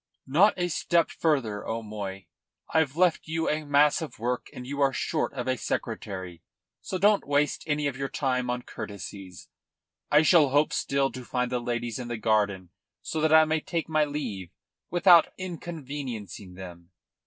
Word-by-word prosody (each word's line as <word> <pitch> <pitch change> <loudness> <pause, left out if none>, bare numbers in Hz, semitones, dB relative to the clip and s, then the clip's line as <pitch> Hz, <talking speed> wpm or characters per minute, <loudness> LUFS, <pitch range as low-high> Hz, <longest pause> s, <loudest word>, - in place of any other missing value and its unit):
"Not 180 +11 +4
a 175 -1 0
step 170 0 +1
farther, 125 -10 0
O'Moy. 105 -4 -5 0.5
I've 160 -2 +2
left 175 -3 +2
you 160 +1 -1
a 155 +1 0
mass 145 +2 +3
of 160 - -7
work, 120 +2 -2
and 125 - -9
you 140 +2 -4
are 135 -1 +4
short 155 +4 -1
of 125 -1 -4
a 130 - +2
secretary. 95 -6 -4 0.4
So 185 - -4
don't 205 -1 +3
waste 145 +1 +1
any 150 -1 0
of 140 -3 -1
your 135 0 -3
time 125 -3 -1
on 125 0 -2
courtesies. 95 -2 -8 0.6
I 150 +1 +5
shall 155 -3 +5
hope 145 +3 +2
still 135 0 0
to 130 - -8
find 125 0 -2
the 125 - 0
ladies 120 -1 -3
in 125 - -5
the 120 -1 -3
garden 100 -4 0 0.3
so 160 - -3
that 155 0 +2
I 160 0 +7
may 155 0 +1
take 165 +1 -3
my 155 -1 +2
leave 125 - -4 0.4
without 175 -1 +6
inconveniencing 140 - -6
them." 90 -2 -10
135 Hz, 170 wpm, -27 LUFS, 110-155 Hz, 0.6 s, I